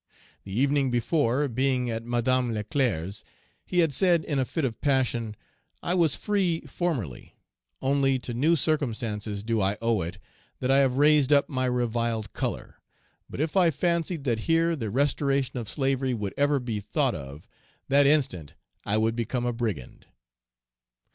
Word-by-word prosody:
The 100 +3 -3
evening 140 0 +2
before, 125 +3 +1
being 130 -1 0
at 115 0 -4
Madame 120 0 0
Leclerc's, 105 - -1 0.4
he 180 - +1
had 150 - -4
said 175 +1 +3
in 145 -3 -1
a 130 - +1
fit 160 +3 -2
of 115 -3 -4
passion, 125 -6 0 0.5
"I 175 - 0
was 170 -5 +4
free 190 -6 0
formerly; 125 - -4 0.5
only 135 0 +2
to 120 -1 -5
new 150 +8 +3
circumstances 115 -9 -2
do 115 -1 0
I 100 +2 +1
owe 115 -3 +1
it 85 +3 -5 0.4
that 130 0 0
I 135 - +5
have 135 -2 +2
raised 150 -1 +4
up 140 -1 +4
my 130 -3 -1
reviled 115 -3 -1
color; - - -4 0.5
but - - -8
if 155 +3 -1
I 180 -3 +5
fancied 170 0 -1
that 120 -5 0
here 165 +1 +3
the 115 -8 -4
restoration 135 +1 0
of 115 - -6
slavery 135 -2 0
would 105 -3 -4
ever 145 0 +2
be 120 -4 -3
thought 130 +5 0
of, 70 -2 -9 0.4
that 140 +1 +4
instant 130 - +1 0.3
I 105 - 0
would 110 +1 +1
become 120 +1 -2
a 120 - 0
brigand." 110 - -5
130 Hz, 160 wpm, -26 LUFS, 115-145 Hz, 0.5 s, I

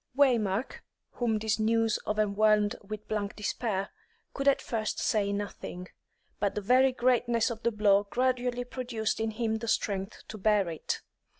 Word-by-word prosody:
Waymark, 235 -5 +2 0.3
whom 230 -3 0
this 215 0 0
news 225 0 +2
overwhelmed 210 0 +2
with 215 +1 -8
blank 210 -1 -2
despair, 205 -2 -2 0.4
could 275 0 -2
at 280 - +5
first 220 -2 -2
say 205 -2 +1
nothing; 200 -3 -5 0.5
but 200 -1 0
the - - 0
very 255 +5 +4
greatness 240 -2 +2
of 225 -1 -6
the 235 - +1
blow 205 -1 +3
gradually 250 0 0
produced 245 -4 -3
in 225 0 0
him 220 0 -1
the 230 - -5
strength 200 -2 -1
to 215 - -7
bear 205 -1 +3
it. 160 -2 -4
220 Hz, 155 wpm, -29 LUFS, 205-240 Hz, 0.5 s, at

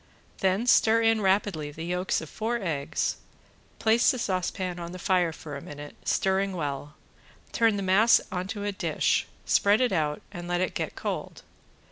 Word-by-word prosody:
Then 195 +4 +1
stir 230 -2 +5
in 225 -1 +3
rapidly 190 -6 +1
the 160 +3 -7
yolks 180 +2 -1
of 160 - -8
four 225 +2 -1
eggs, 155 -8 -2 0.6
place 225 +2 +4
the 255 - +1
saucepan 185 -3 -2
on 170 0 -6
the - - -6
fire 180 -2 +2
for 155 -2 -8
a 140 - -6
minute, 145 +1 -9
stirring 195 0 +1
well, 145 -2 -4 0.6
turn 225 -2 +3
the 200 - -2
mass 200 +5 +5
onto 190 +3 -4
a 205 - -1
dish, 190 -5 0 0.2
spread 205 +2 +4
it 250 -1 +2
out 150 -4 -1
and 175 0 -7
let 175 0 0
it 185 -1 -1
get - - -3
cold. - - -5
185 Hz, 170 wpm, -27 LUFS, 165-205 Hz, 0.6 s, stir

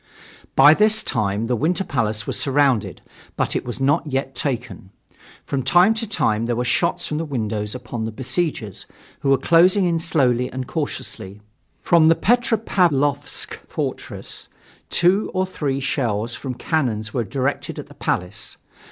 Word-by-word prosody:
By 145 +3 +8
this 215 +4 +4
time 105 +1 -1
the 125 +1 0
Winter 170 - 0
Palace 110 - -1
was - - -3
surrounded, 135 -5 +1 0.3
but - - 0
it - - -1
was 120 +1 -6
not 145 +4 +1
yet 135 -1 -2
taken. 120 -9 -3 0.6
From 140 - -2
time 175 - +5
to 225 0 -3
time 115 - +1
there 120 - 0
were 125 +1 -1
shots 170 +8 +1
from 150 - -2
the - - -1
windows 110 -7 -3
upon 120 -2 -5
the 110 - -4
besiegers, 125 - -2 0.3
who 140 - -1
were 135 - +5
closing 180 +7 +4
in 170 -2 +1
slowly 125 -7 +1
and 130 0 -4
cautiously. 115 - -5 0.4
From 165 -2 +4
the 165 - +6
Petropavlovsk 185 - +1
Fortress, - - -5 0.4
two 185 +4 +3
or 185 0 +2
three 145 -7 -2
shells 120 -5 -1
from 130 0 -5
cannons 120 -7 -1
were 120 - 0
directed 135 +6 -2
at - - -6
the - - -15
Palace. 90 +5 -3
135 Hz, 155 wpm, -21 LUFS, 115-165 Hz, 0.6 s, By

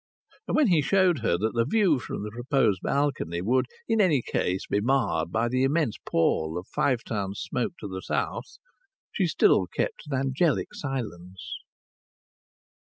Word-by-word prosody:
And - - 0
when 305 - +5
he 165 -4 +4
showed 185 0 +3
her 110 -7 +1
that 110 +5 -1
the 115 - +2
view 180 - +2
from 110 - -5
the 105 - -5
proposed 120 -4 +1
balcony 135 - -1
would 120 +9 +1 0.2
in 225 -1 +3
any 155 - +3
case 90 +1 -1
be 105 - 0
marred 115 -9 +1
by 115 +4 +1
the 130 +2 0
immense 140 -3 +1
pall 80 0 +1
of 90 - -5
Five 125 -4 0
Towns 100 -2 -3
smoke 125 +4 -2
to 105 - -5
the 95 -1 -6
south, - - -3 0.5
she - - +1
still - - +3
kept - - -3
an 135 - 0
angelic 135 +5 0
silence. 95 - -6
125 Hz, 165 wpm, -26 LUFS, 100-145 Hz, 0.5 s, when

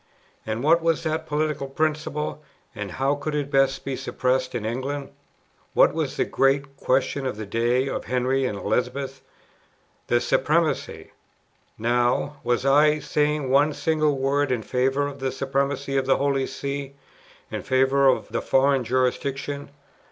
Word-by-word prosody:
And 110 +3 -2
what 165 +3 +4
was 165 -1 +1
that 160 0 -2
political 150 -2 -1
principle, 150 +1 -2 0.3
and 100 -3 -6
how 135 +2 +1
could 150 +1 -3
it 145 -1 -2
best 135 -1 +2
be 135 - -2
suppressed 130 0 -1
in 110 - -3
England? 135 +5 -3 0.6
What - - +5
was - - -2
the - - +2
great 135 0 +1
question 135 +1 0
in 125 - -3
the 110 0 -6
days 120 +5 +1
of - - -4
Henry 130 +1 0
and 105 -5 -2
Elizabeth? 130 +5 -2 0.9
The 120 - +3
Supremacy; 155 +6 0 0.7
now, 120 +5 +1
was 120 +1 0
I 150 +2 +5
saying 150 -2 0
one 145 +3 +4
single 155 -2 +1
word 135 +1 +1
in 120 -3 -1
favour 130 +5 +1
of 140 -1 -6
the 135 0 -1
Supremacy 135 +1 -1
of 130 -1 0
the 135 - +4
Holy 135 -1 0
See, 140 0 -5 0.6
in - - -3
favour 135 +1 +3
of 130 - +2
the - - -2
foreign 135 0 +3
jurisdiction? 135 +3 -1
135 Hz, 150 wpm, -24 LUFS, 130-145 Hz, 0.9 s, What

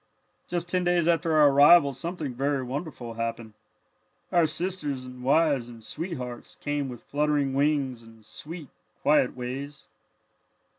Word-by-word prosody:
"Just 175 0 -2
ten 180 +1 0
days 175 -2 +2
after 165 -1 +2
our 150 -2 +7
arrival 145 +1 +7
something 155 0 -4
very 135 +2 -1
wonderful 130 -2 -5
happened. 115 -1 -4 0.8
Our 170 -2 +4
sisters 150 -7 -3
and 125 0 -10
wives 140 -2 +2
and 115 -2 -12
sweethearts 130 - -6
came 145 -2 -3
with 120 -2 -9
fluttering 145 -2 0
wings 140 -3 +1
and 115 -1 -17
sweet, 165 - -9 0.3
quiet 145 -4 +3
ways. 140 +3 -6
140 Hz, 135 wpm, -27 LUFS, 125-160 Hz, 0.8 s, our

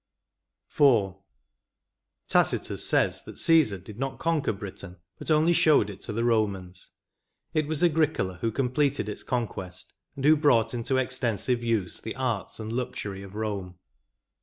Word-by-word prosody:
IV. 115 -10 +4 1.1
Tacitus - - +2
says - - +2
that - - -11
Caesar 155 -12 +4
did 100 +4 -12
not 135 0 -3
conquer 165 -3 0
Britain, 100 -2 -8 0.2
but - - -6
only 155 +2 +4
showed 150 -11 +4
it 95 - -12
to - - -5
the 115 +2 -1
Romans; 100 -6 -1 0.6
it 155 -2 +1
was 155 +2 -1
Agricola 155 - +1
who 115 - 0
completed 135 0 0
its 105 - -5
conquest, 105 -7 -4 0.2
and 135 - -4
who 155 +1 +7
brought 125 -7 +3
into 120 +2 -1
extensive 125 -2 -1
use 110 -7 -1
the 110 - -6
arts 115 -9 -3
and 110 0 -5
luxury 105 -5 -4
of 100 -1 -11
Eome. 100 -4 -4
115 Hz, 145 wpm, -27 LUFS, 100-140 Hz, 1.1 s, who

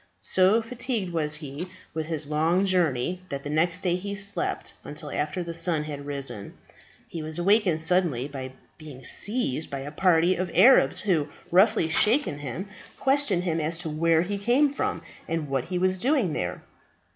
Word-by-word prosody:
So 195 +5 +3
fatigued 230 -5 -3
was 150 -2 0
he 150 +3 -6 0.2
with 160 -1 -3
his 160 -2 -1
long 160 +6 +1
journey, 175 -2 0
that 140 0 -5
the 145 - -5
next 170 +4 +1
day 180 -1 +1
he 200 +2 -5
slept 200 0 -2
until 150 0 -6
after 155 +5 -2
the 170 0 -6
sun 165 -2 +1
had 145 -2 -7
risen. 135 -8 -5 0.5
He 165 - -6
was 155 +1 -5
awakened 180 -3 +3
suddenly 165 -7 +2
by 130 -2 -7 0.3
being 145 -4 -11
seized 200 - +1
by 140 -1 -5
a 145 +2 -7
party 175 +2 +3
of 185 0 -2
Arabs, 240 +10 +6
who, 165 -8 0 0.2
roughly 185 -2 +4
shaking 210 - +2
him, 145 - -5 0.3
questioned 270 -10 +2
him 165 -3 -1
as 160 +2 -1
to 165 -2 -5
where 165 +1 +2
he 200 +2 -3
came 255 +7 +3
from, 285 - -3 0.2
and 165 -2 -2
what 135 -2 -1
he 180 +1 -3
was 185 +1 +1
doing 250 - +1
there. 90 -7 -4
170 Hz, 175 wpm, -26 LUFS, 150-190 Hz, 0.5 s, Arabs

